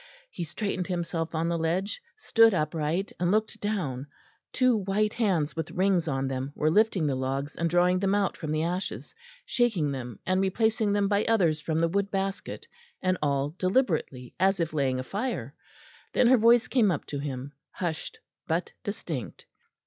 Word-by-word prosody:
He 175 - -4
straightened 185 +2 -3
himself 170 -2 -2
on 160 +1 0
the 170 0 0
ledge, 180 +6 -1 0.2
stood 225 - +5
upright 160 +3 -1
and 175 0 +1
looked 215 +3 0
down; 150 -11 -2 0.4
two 255 -2 +3
white 210 +1 0
hands 185 -10 0
with 160 -1 -3
rings 185 -1 +1
on 135 -2 -1
them 135 +1 -3
were 155 +1 +2
lifting 210 -3 +3
the 145 - +1
logs 135 +3 -2
and 170 0 0
drawing 180 +2 +3
them 195 +1 +2
out 200 -2 +1
from 155 -3 -5
the 155 +1 0
ashes, 180 +3 -3 0.3
shaking 220 - +1
them 125 -5 -5
and 185 0 +2
replacing 220 +2 +1
them 205 -1 +2
by 205 +1 +2
others 175 -9 +2
from 160 +1 -1
the 165 +1 +3
wood 200 +3 0
basket; 195 0 -3 0.4
and 185 0 +2
all 140 0 0
deliberately, 180 - 0
as 190 +1 +3
if 165 -2 -1
laying 135 -4 +1
a - - -3
fire. 195 - -3 0.6
Then - - +4
her 260 - +7
voice 235 +1 +5
came 235 -6 +3
up 165 -6 -1
to 145 - -4
him, 140 -1 -5 0.2
hushed 170 -3 -4 0.3
but 165 +3 -1
distinct. 165 - -5
175 Hz, 175 wpm, -28 LUFS, 150-200 Hz, 0.6 s, her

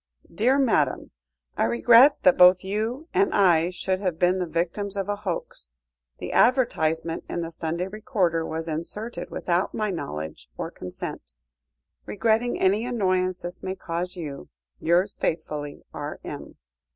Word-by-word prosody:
"DEAR 240 +9 +3
MADAM, 185 - +1 0.4
"I - - +2
regret 230 - +6
that 185 - +6
both 180 +1 +7
you 220 +10 -3
and 390 +1 +3
I 175 -4 +4
should 185 +1 -2
have 185 -5 -2
been 180 +2 +2
the 180 - -1
victims 180 +5 -2
of 195 - -2
a 205 - 0
hoax. 185 - -5 0.4
The - - -6
advertisement 165 - +2
in 175 - -2
the 165 0 -5
Sunday 170 +2 -3
Recorder 195 -6 0
was 160 +1 -4
inserted 190 +9 -5
without 175 +2 -1
my 215 -2 -1
knowledge 75 - -6
or - - -4
consent. 90 -8 -7 0.7
Regretting 225 +3 +1
any 200 +4 +3
annoyance 185 -6 0
this 175 +1 -7
may 190 0 -4
cause 180 0 -4
you. 150 -6 -7 0.3
"Yours 180 +4 +2
faithfully, 150 -3 -3
R.M." - - -7
185 Hz, 140 wpm, -25 LUFS, 165-210 Hz, 0.7 s, both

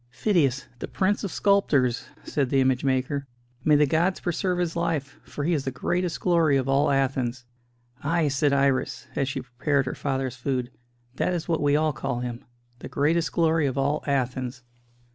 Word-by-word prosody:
"Phidias, 140 - +1
the - - -4
prince 205 +3 0
of 200 - -2
sculptors!" 145 - +2 0.2
said 140 -4 -1
the 135 - +2
image 130 -1 +2
maker. 135 +1 0 0.4
"May 150 - +5
the 150 0 +5
gods 170 +6 +1
preserve 180 +1 -1
his 175 -2 -1
life; 160 -5 -2
for 145 - -6
he 170 +4 +1
is 145 -4 0
the 135 - -2
greatest 175 +5 -2
glory 165 -5 +3
of 135 -1 -1
all 135 +1 +3
Athens!" 130 -2 0 0.6
"Ay," 165 +1 +1
said 140 +1 +2
Iris, 135 -2 +1
as 135 -1 0
she - - -3
prepared 135 +3 0
her 130 - -3
father's 135 -3 -2
food, 125 0 -2 0.5
"that 180 - +1
is 170 - -4
what 165 -2 0
we 145 0 +3
all 155 0 +2
call 135 -2 -3
him 120 -1 -5 0.4
the - - -8
greatest 160 +3 +1
glory 160 -3 +2
of 130 0 -3
all 140 +2 0
Athens." 130 -2 -1
140 Hz, 180 wpm, -25 LUFS, 130-165 Hz, 0.6 s, May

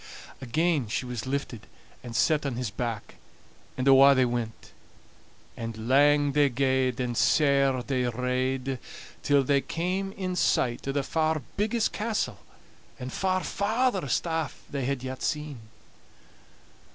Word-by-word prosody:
Again 150 +1 0
she 115 +4 -2
was 125 -1 -5
lifted 130 -4 -4 0.4
and 120 -2 -8
set 155 +3 +2
on 140 -4 -2
his 120 -4 -3
back, 115 -1 -5 0.6
and 130 +1 -1
awa' 135 +1 +8
they 130 -1 +4
went. 120 -2 -4 0.8
And 115 -1 -6
lang 145 +2 +4
they 145 0 +3
gaed, 130 -1 +1
and 125 -1 -2
sair 140 -2 +3
they 130 -1 -1
rade, 130 +2 -1 0.4
till 145 -1 +3
they 140 +1 +2
came 185 +5 -2
in 185 -2 -3
sight 125 -7 +1
o' - - +1
the 140 0 -1
far 155 0 0
biggest 215 +2 0
castle, 215 0 -2 0.6
and 125 0 -6
far 185 -1 0
farthest 200 - 0
aff, 160 -4 -3
they 140 -3 -2
had 135 -1 -2
yet 130 0 -6
seen. 150 -4 -3
135 Hz, 140 wpm, -27 LUFS, 125-155 Hz, 0.8 s, awa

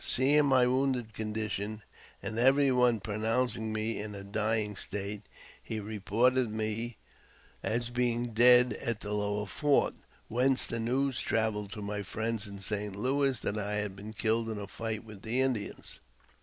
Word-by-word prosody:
Seeing 145 +3 +3
my 130 -2 +5
wounded 125 -3 0
con 110 0 -4
dition, 110 0 -3 0.4
and 110 - -3
every 135 +2 +5
one 125 -2 +3
pronouncing 110 +2 -1
me 110 +1 -2
in 105 0 -5
a 100 - -7
dying 105 +1 -1
state, 100 +2 -3 0.4
he 110 - -4
re 105 +1 -6
ported 125 +5 +2
me 110 +1 -3 0.6
as 120 +2 -1
being 120 -1 0
dead 125 +2 +7
at 115 -2 -1
the 105 0 -4
lower 105 0 -1
fort, 145 +7 +2 0.3
whence 130 +3 +2
the 115 - -3
news 130 +3 0
travelled 105 -2 -1
to 105 - -6
my 105 0 -3
friends 110 +2 -2
in 100 0 -8
St. 100 0 -3
Louis 135 +3 +1
that 105 - -2
I 105 0 -2
had 105 -2 -2
been 105 +3 -9
killed 115 +1 +1
in 110 - -3
a 100 - -5
fight 110 +1 -4
with 105 -3 -12
the 115 +4 -1
Indians. 130 -6 -1
110 Hz, 170 wpm, -30 LUFS, 105-125 Hz, 0.6 s, dead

